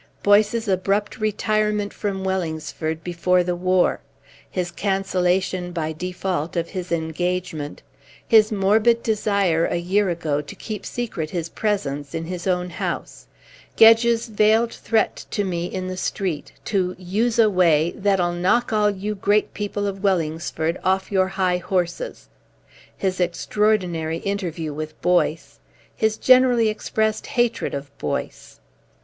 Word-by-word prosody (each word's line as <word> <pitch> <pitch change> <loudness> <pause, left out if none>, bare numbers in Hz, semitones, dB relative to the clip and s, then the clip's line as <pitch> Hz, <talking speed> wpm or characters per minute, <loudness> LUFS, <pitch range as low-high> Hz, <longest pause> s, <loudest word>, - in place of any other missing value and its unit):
Boyce's 215 +3 +3
abrupt 200 +4 0
retirement 210 -1 0
from 195 -2 -3
Wellingsford 160 -3 -3
before 180 +1 +1
the 175 0 -1
war; 185 +1 +2 0.5
his 180 -2 -3
cancellation 185 -1 0
by 160 -2 -2
default 180 -1 -3
of 170 -1 -1
his 185 -3 -6
engagement; 165 -2 -2 0.4
his 220 -1 +5
morbid 215 +4 +3
desire, 200 -6 +1
a - - -2
year 185 +3 +1
ago, 155 -4 -1
to 145 - -10
keep 215 -3 -6
secret 205 -10 -4
his 170 -2 -3
presence 145 -11 -2
in 165 0 -3
his 180 +1 -5
own 180 -1 0
house; - - -5 0.5
Gedge's 230 +1 +6
veiled 220 +2 +3
threat 225 -1 0
to 205 - -1
me 175 -2 -2
in 185 0 -4
the 185 0 -5
street 185 -4 -3
to 185 -3 0
use 210 +6 -1
a 225 -2 +6
way 170 -5 +3
"that'll 190 -3 +1
knock 195 +7 +1
all 210 -1 +3
you 205 +1 -3
great 205 +1 +1
people 205 0 -3
of 195 -1 -4
Wellingsford 165 -3 -1
off 190 +1 0
your 190 -1 +3
high 190 -2 0
horses;" 180 - -3 0.7
his 190 -1 -1
extraordinary 175 -2 0
interview 170 -5 -3
with 155 +1 -6
Boyce; 175 -2 +1 0.4
his 220 0 +1
generally 250 -3 +5
expressed 220 0 -1
hatred 240 - 0
of 140 0 -7
Boyce. 75 - -4
185 Hz, 135 wpm, -22 LUFS, 170-210 Hz, 0.7 s, Gedge's